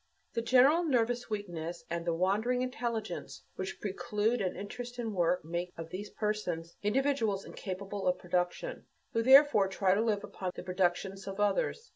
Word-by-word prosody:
The 230 - 0
general 260 +8 +5
nervous 245 -5 +1
weakness 175 -5 -4
and 170 0 -3
the 170 - +2
wandering 215 +8 +1
intelligence 235 -6 -4
which 190 0 -5
preclude 210 +4 0
an 185 -2 -1
interest 240 +6 -6
in 230 -3 -3
work 180 -2 +1
make 175 +2 -3
of 165 0 -7
these 200 +3 -5
persons 180 -6 -3
individuals 225 -3 +1
incapable 195 +1 -5
of 180 - +3
production, 180 - -2 0.3
who 230 - +2
therefore 265 -4 +7
try 190 0 +2
to 205 - +2
live 215 -3 +1
upon 185 -2 -5
the - - -6
productions 185 +1 -1
of 195 +1 -5
others. 460 - +1
205 Hz, 160 wpm, -32 LUFS, 180-235 Hz, 0.3 s, therefore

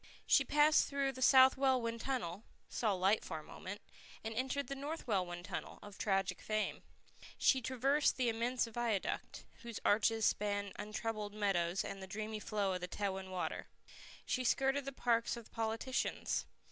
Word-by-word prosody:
She - - +5
passed 300 +1 +4
through 280 -1 0
the 260 0 -9
South 260 0 +7
Welwyn 255 -4 +1
Tunnel, 220 -7 -3 0.3
saw 220 -3 0
light 195 +3 +2
for 160 - -5
a 155 - -8
moment, 200 +6 -8 0.4
and 225 - -3
entered 265 +4 -1
the 275 - -5
North 285 +4 -5
Welwyn 180 -5 -1
Tunnel, 195 -1 -5
of 205 -1 -10
tragic 195 -3 0
fame. 215 0 -1 0.6
She 265 - +4
traversed 265 +4 +2
the 255 -2 +1
immense 235 +2 +1
viaduct, 230 -3 -2 0.2
whose 235 -2 -6
arches 220 +1 +3
span 205 -1 0
untroubled 215 -1 -4
meadows 190 -4 +1
and 195 - -6
the 190 - -7
dreamy 215 +2 -4
flow 205 -2 -1
of 180 - -3
Tewin 190 -1 -3
Water. 185 -1 -3 0.6
She 255 - 0
skirted 270 +2 +2
the 275 - -3
parks 235 -2 +1
of 235 - -11
politicians. 225 +3 -1
225 Hz, 160 wpm, -36 LUFS, 200-260 Hz, 0.6 s, South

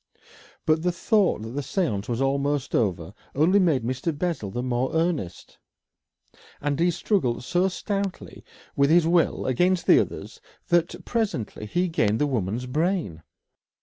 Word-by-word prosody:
But 155 0 +2
the 180 +1 +1
thought 195 - +1
that 110 - -6
the 140 +3 -3
séance 135 - -2
was 120 +1 -1
almost 140 0 0
over 95 -4 0 0.2
only 170 +8 +4
made 160 - +2
Mr. 130 +7 -2
Bessel 165 - -2
the 120 +5 -4
more 125 0 -1
earnest, 160 - -2 1.0
and 145 0 -2
he 175 +1 +3
struggled 170 - 0
so 180 +7 +1
stoutly 195 0 -4 0.3
with 140 0 +3
his 170 +1 +5
will 170 -1 +2
against 175 +8 +1
the - - +6
others - - -5 0.3
that 175 -1 +1
presently 195 - -2
he 180 - 0
gained 110 -10 +1
the 150 - +1
woman's 120 -3 -2
brain. 155 - -1
145 Hz, 150 wpm, -25 LUFS, 120-175 Hz, 1.0 s, the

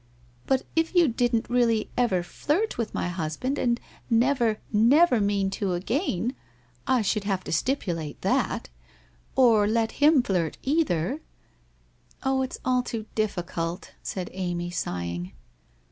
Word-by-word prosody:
'But 265 -1 +2
if 325 +3 +1
you 345 -3 +6
didn't 240 -2 +1
really 235 -3 +2
ever 225 -8 +2
flirt 315 - -1
with 230 -2 -2
my - - -2
husband 180 - -2
and 240 -1 +1 0.3
never, 235 -2 +2
never 250 +5 +5
mean 200 -1 +1
to 195 -2 -1
again... 230 - -1 0.5
I 255 -4 +3
should 210 0 0
have 195 -2 -1
to - - -6
stipulate 165 - -1
that,... - - 0 0.7
Or 225 -5 +5
let 225 +1 +1
him 295 -3 +6
flirt 175 -7 -1
cither? 270 - +1 0.4
' - - -37
' - - -28
Oh, 265 0 +1
it's 260 - -3
all 255 -1 +3
too 230 -3 -5
difficult,' 175 -4 -2
said 185 -2 -5
Amy, 175 -2 -3
sighing. 90 - -4
225 Hz, 140 wpm, -26 LUFS, 180-255 Hz, 0.7 s, you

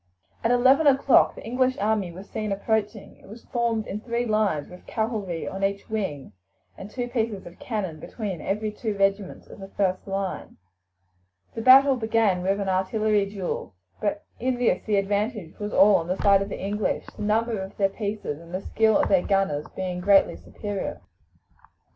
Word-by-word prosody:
At 230 - +2
eleven 260 +5 +5
o'clock 275 -1 +5
the - - -10
English 255 +2 +1
army 205 -3 0
was 190 +4 -11
seen 215 -2 -4
approaching. 210 +1 -2
It - - -19
was 220 +4 -12
formed 235 -3 -1
in 205 - -5
three 235 +1 -2
lines, 215 -9 +1
with 180 - -14
cavalry 215 -7 -2
on 195 +1 -5
each 200 +2 -2
wing, 190 -11 -3 0.4
and 195 - -9
two 245 +2 -4
pieces 225 -5 -2
of 175 0 -12
cannon 190 -9 -4
between 195 -2 -5
every 210 +2 -2
two 210 -1 -4
regiments 195 0 0
of - - -13
the 195 - -8
first 190 -1 -1
line. 195 -1 -4 1.0
The 225 - -4
battle 270 +3 +7
began 220 -5 +1
with 195 +2 0
an 200 - -2
artillery 200 +2 +1
duel, 195 - -5 0.2
but 205 0 -2 0.2
in 255 +1 0
this 245 -1 +1
the 210 - +2
advantage 205 -2 -1
was 210 0 -4
all 200 0 +6
on 165 - -4
the 185 +2 -1
side 200 -1 +4
of 195 - -3
the - - -5
English, 205 +2 -2
the - - -9
number 220 +1 +1
of 190 +1 -8
their 195 - +3
pieces 200 -7 -4
and 170 +2 -8
the 185 - -3
skill 220 -1 +3
of - - +2
their 190 -3 +4
gunners 195 -8 0
being 185 -1 -3
greatly 195 - +4
superior. 195 - -5
205 Hz, 185 wpm, -25 LUFS, 190-220 Hz, 1.0 s, battle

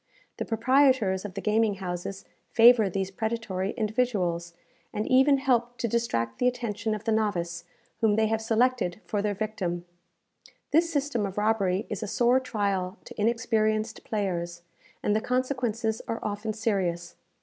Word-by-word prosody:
The - - -3
proprietors 235 -4 +3
of 195 - -7
the - - -4
gaming 215 -1 +2
houses 185 0 -5 0.2
favour 230 -3 +6
these 190 +1 -2
predatory 205 -3 -2
individuals, 205 -7 -1 0.4
and 210 - -2
even 265 +2 +5
help 245 -3 +1
to 235 - -1
distract 160 - -1
the 250 - +3
attention 225 -3 -1
of 210 - -7
the 225 - 0
novice 175 -6 -1 0.3
whom 220 -2 +3
they 220 0 +3
have 220 0 0
selected 225 -4 +1
for 205 - -1
their 205 0 -1
victim. 190 -5 -3 0.9
This 330 +3 +3
system 280 -7 0
of 195 -1 -4
robbery 205 -3 +1
is 210 - -4
a 215 - -3
sore 245 +5 +3
trial 200 -6 -2
to - - -7
inexperienced 220 -1 0
players, 175 -5 -3 0.4
and 210 - +2
the 220 - +1
consequences 245 -3 -1
are 225 - -2
often 210 +1 -3
serious. 190 -6 -1
215 Hz, 150 wpm, -27 LUFS, 195-235 Hz, 0.9 s, favour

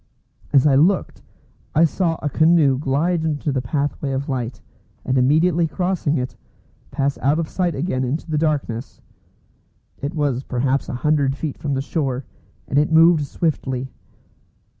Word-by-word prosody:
As 135 -1 +5
I 145 - +5
looked, 175 +8 +2 0.5
I 160 +3 +6
saw 165 +1 0
a - - 0
canoe 155 -3 +3
glide 160 +5 0
into 150 -2 -1
the 135 -1 -1
pathway 140 +2 -2
of 135 +1 -3
light, 125 -2 -3 0.5
and 130 - 0
immediately 160 +6 +3
crossing 180 -2 -1
it, 125 0 -4 0.5
pass 140 0 -1
out 140 +4 +2
of 165 -1 -1
sight 175 -3 -1
again 135 -3 -1
into 140 +7 -3
the 150 - +1
darkness. 140 -6 -2 1.0
It 145 +5 -4
was 140 -5 0
perhaps 135 +1 -1
a - - -3
hundred 145 -3 +2
feet 145 0 -5
from 140 -2 -2
the 135 - -2
shore, 135 -4 -2 0.4
and 140 - +2
it 150 +2 +1
moved 160 -2 +5
swiftly. 130 -5 -2
145 Hz, 155 wpm, -21 LUFS, 135-160 Hz, 1.0 s, I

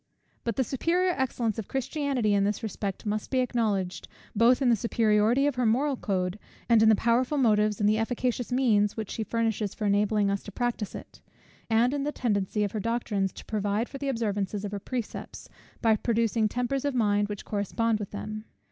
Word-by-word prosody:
But 230 -3 -2
the 260 - +2
superior 350 +8 +1
excellence 235 -5 -1
of 215 - -5
Christianity 270 -4 0
in 200 -1 +3
this 205 +3 -1
respect 200 -2 -4
must 210 0 -2
be 260 - 0
acknowledged, 215 -7 0 0.3
both 235 +4 +5
in 265 -3 +2
the 235 - +5
superiority 225 +3 +2
of 290 - +2
her 250 - +1
moral 270 +6 +2
code, 190 -3 -2 0.3
and 230 -2 +5
in 220 - +6
the 220 - +6
powerful 245 +6 +1
motives 210 -5 +3
and 205 - +3
efficacious 235 +3 0
means 220 -5 +2
which 220 -3 -4
she 225 - -2
furnishes 225 -2 -1
for 215 - -3
enabling 205 0 +2
us 200 - -1
to 205 - -10
practise 240 -2 -2
it; - - -11 0.5
and 230 +3 +3
in 285 - -1
the 290 +1 -1
tendency 210 -5 0
of 205 - -1
her 215 - -3
doctrines 210 -4 -1
to - - -11
provide 210 +2 -1
for 275 - -8
the 280 0 -2
observance 210 -5 -1
of 205 0 -4
her 205 - -3
precepts, 240 +2 -6 0.4
by 225 -1 +5
producing 225 -1 +1
tempers 250 +4 -1
of 285 -2 -1
mind 205 -3 +2
which 205 -1 -6
correspond 215 +2 0
with 205 - -5
them. 215 +1 -6
220 Hz, 195 wpm, -27 LUFS, 205-245 Hz, 0.5 s, in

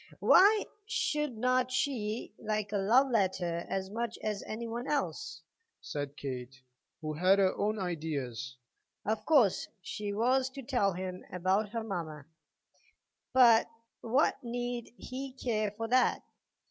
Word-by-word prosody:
"Why 415 +3 +6 0.2
should 300 - -1
not 255 +2 +2
she 240 -5 -1
like 210 -1 -2
a 205 - 0
love 245 +8 +4
letter 180 -5 0
as 190 0 -2
much 230 +1 -3
as 210 -2 -2
any 230 +2 -4
one 235 +3 -4
else?" 300 +9 -2 0.4
said 145 -1 -5
Kate, 130 0 -6 0.4
who 155 -1 -3
had 185 +5 +4
her 190 -2 +3
own 215 +1 0
ideas. 145 - -4 0.5
"Of 220 +1 -2
course 260 - +4 0.2
she 210 +3 -5
has 255 +5 +2
to 275 - -6
tell 230 -7 +1
him 185 0 -5
about 190 +4 +1
her 230 +1 -3
mamma, 165 -8 -5 1.1
but 240 -4 +6 0.3
what 255 +5 +1
need 245 0 -4
he 265 +1 -6
care 220 -5 -1
for 225 +3 -5
that? 255 +1 +3
215 Hz, 135 wpm, -31 LUFS, 185-250 Hz, 1.1 s, Why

